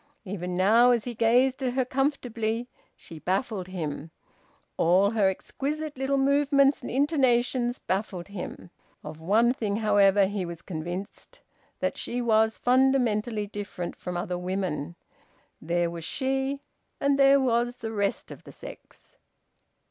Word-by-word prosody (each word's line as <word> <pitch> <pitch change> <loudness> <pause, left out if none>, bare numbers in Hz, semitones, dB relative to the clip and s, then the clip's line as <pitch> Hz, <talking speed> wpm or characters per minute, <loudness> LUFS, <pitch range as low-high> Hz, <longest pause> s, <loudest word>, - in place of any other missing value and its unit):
Even 180 -2 -4
now, 225 +6 +5
as 240 -3 +3
he 245 - -5
gazed 250 +4 +2
at 250 -1 0
her 260 -1 +1
comfortably, 245 -4 -1 0.3
she 165 -2 -12
baffled 190 - -2
him; 160 -4 -5 0.7
all 185 +4 +3
her 210 -4 +3
exquisite 295 +10 -4
little 270 +1 0
movements 280 0 +3
and - - -6
intonations 255 -3 +1
baffled 190 -1 -3
him. 180 -2 -8 0.3
Of 155 +1 -9
one 225 +8 +3
thing, 210 -5 -2
however, 205 -2 +4
he 200 0 -2
was 170 -1 -7
convinced: 180 - -7 0.4
that - - -1
she 245 - -3
was 220 -2 +2
fundamentally 245 -4 +2
different 200 -4 -6
from 180 -1 -5
other 175 0 -3
women. 180 -4 -3 0.7
There 170 +1 0
was 170 -1 -7
she, 270 - -1 0.4
and 280 0 +2
there 275 0 +6
was 240 -1 +1
the 225 -2 -6
rest 205 -2 -2
of - - -11
the - - -12
sex. - - -13
220 Hz, 140 wpm, -27 LUFS, 185-260 Hz, 0.7 s, there